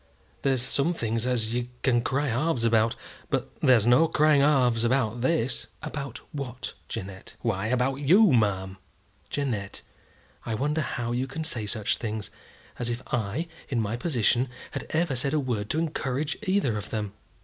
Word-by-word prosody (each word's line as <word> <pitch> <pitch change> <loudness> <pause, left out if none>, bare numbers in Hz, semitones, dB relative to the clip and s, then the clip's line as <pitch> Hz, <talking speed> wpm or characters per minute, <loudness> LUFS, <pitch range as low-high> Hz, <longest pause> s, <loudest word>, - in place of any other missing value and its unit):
There's 135 -3 +1
some 140 +6 +1
things 115 -2 -1
as 115 -3 0
you 120 0 -1 0.2
can 120 -3 +3
cry 140 +4 0
halves 130 +1 0
about, 115 -1 +3 0.3
but - - -1
there's 120 -5 +5
no 125 +7 +6
crying 155 -2 +4
halves 125 -6 +4
about 120 -2 +1
this." 130 -2 0 0.2
"About 140 -2 -5
what, 130 -5 -5 0.2
Jeannette?" 95 +1 -7
"Why, 110 -3 0
about 125 +2 +1
you, 180 +8 +5
ma'am." 95 -4 +1 0.5
"Jeannette, 115 -9 -3 0.6
I 110 - -2
wonder 150 +6 0
how 120 -3 -2
you 125 +2 -1
can 160 +4 -4
say 115 -9 0
such 105 0 0
things; 110 -3 -4 0.5
as 120 -1 +1
if 120 +2 -3
I, 120 +9 -1 0.2
in 125 - 0
my 110 0 -1
position, 125 -2 +1 0.2
had - - -5
ever 160 -3 +1
said 135 +4 +1
a - - +3
word 115 -6 -2
to - - 0
encourage 150 -2 -1
either 185 - +2
of 105 - -8
them. 105 -2 -3
125 Hz, 165 wpm, -27 LUFS, 115-140 Hz, 0.6 s, no